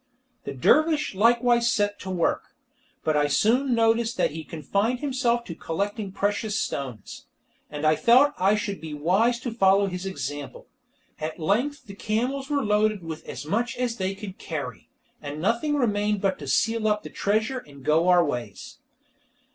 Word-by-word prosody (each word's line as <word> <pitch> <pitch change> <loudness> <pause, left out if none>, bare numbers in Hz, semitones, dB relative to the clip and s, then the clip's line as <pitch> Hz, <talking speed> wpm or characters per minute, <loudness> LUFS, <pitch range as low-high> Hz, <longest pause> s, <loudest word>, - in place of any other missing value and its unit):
The - - -4
dervish 305 - +3
likewise 235 +3 +3
set 205 -1 0
to 190 - -7
work, 180 -3 -1 0.5
but 155 - +1
I 145 0 +3
soon 245 - +2
noticed 230 +1 +2
that - - +1
he 160 +1 -6
confined 200 - -1
himself 255 -4 0
to 170 - -6
collecting 200 +5 -3
precious 205 +2 -1
stones, 125 -7 -5 0.4
and 150 +1 -4
I 155 0 +5
felt 260 - +5
I 195 +3 +4
should 200 -4 -3
be 155 -2 -6
wise 195 +11 +2
to 245 - -4
follow 195 -3 +4
his 185 0 -4
example. 145 -5 -6 0.5
At 155 +1 -4
length 235 - -1
the 200 - -10
camels 245 +7 -2
were 285 -3 0
loaded 210 -2 +1
with 160 -1 -7
as - - -6
much 230 +9 -1
as 245 -2 -1
they 190 0 -2
could 195 -1 -9
carry, - - -6 0.3
and 145 0 -6
nothing 235 - 0
remained 210 -5 +1
but 190 -1 0
to 145 - -8
seal 225 +10 +1
up 210 0 +1
the - - -9
treasure, 220 +6 0
and 140 - -15
go 160 +3 +3
our 180 -1 +5
ways. 120 -9 -6
205 Hz, 170 wpm, -25 LUFS, 160-235 Hz, 0.5 s, I